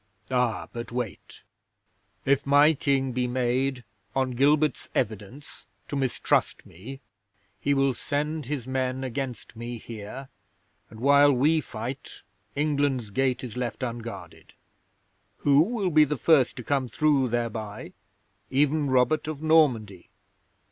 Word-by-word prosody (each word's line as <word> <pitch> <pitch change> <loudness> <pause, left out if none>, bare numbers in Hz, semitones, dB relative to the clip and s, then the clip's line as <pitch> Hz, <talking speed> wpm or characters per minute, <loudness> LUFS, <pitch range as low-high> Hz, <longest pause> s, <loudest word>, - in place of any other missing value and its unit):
'"Ah, 125 -3 0
but 120 0 -6
wait! 120 -4 -6 0.8
If 140 0 +3
my 145 +3 +5
King 135 -2 0
be 125 0 -1
made, 125 +1 0 0.3
on 130 -1 +1
Gilbert's 145 +3 +2
evidence, 110 +4 -4 0.2
to - - -3
mistrust 135 -3 0
me, 130 +11 -10 0.6
he 140 0 +1
will 135 -1 +2
send 150 +2 -3
his 140 -4 -3
men 130 0 -2
against 130 -3 -5
me 120 +1 -6
here, 115 +4 -8 0.6
and 110 - -12
while 140 +2 +6
we 150 +5 +3
fight, 125 +2 -7 0.3
England's 140 -6 0
gate 130 +3 0
is 125 -3 -7
left 125 0 -3
unguarded. 115 -1 -7 0.8
Who 140 -1 +4
will 195 +2 +1
be 155 -1 +6
the 150 0 -1
first 140 -3 +3
to 125 - -7
come 135 0 0
through 140 +1 +2
thereby? 115 -3 -4 0.6
Even 145 +1 +2
Robert 130 +4 +2
of 155 -1 -5
Normandy. 125 - +2
130 Hz, 125 wpm, -26 LUFS, 120-145 Hz, 0.8 s, while